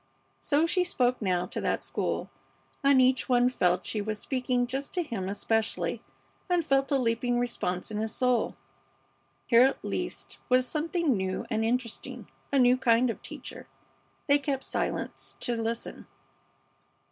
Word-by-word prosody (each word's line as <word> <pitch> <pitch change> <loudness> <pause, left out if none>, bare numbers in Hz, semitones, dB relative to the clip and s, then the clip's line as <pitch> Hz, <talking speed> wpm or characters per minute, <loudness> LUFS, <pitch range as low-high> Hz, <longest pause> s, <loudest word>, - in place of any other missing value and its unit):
So 300 +2 +2
she 360 +2 +2
spoke 250 -8 +1
now 180 -3 +1
to - - -5
that - - 0
school, - - -2 0.5
and 275 -1 +6
each 255 0 +3
one 245 0 +4
felt 180 -6 +1
she 215 - -1
was 215 +1 -3
speaking 250 +1 0
just 270 +6 -4
to 355 - +1
him 200 - -4
especially, 220 +2 -1 0.5
and 350 -3 +2
felt 270 -2 +2
a 280 - +4
leaping 240 0 +1
response 220 -6 -2
in 210 - -2
his 220 0 -2
soul. 250 0 +1 0.9
Here, 235 -1 +6
at 265 +2 +2
least, - - -4
was 255 0 +4
something 320 -2 0
new 190 -1 -2
and 220 -1 +1
interesting, 235 0 -2 0.2
a 280 - +2
new 250 -1 +5
kind 240 -1 +3
of - - -9
teacher. - - -9 0.6
They 285 -1 +4
kept 275 -1 -2
silence - - -3
to 240 - 0
listen. 230 0 -4
245 Hz, 155 wpm, -28 LUFS, 225-270 Hz, 0.9 s, and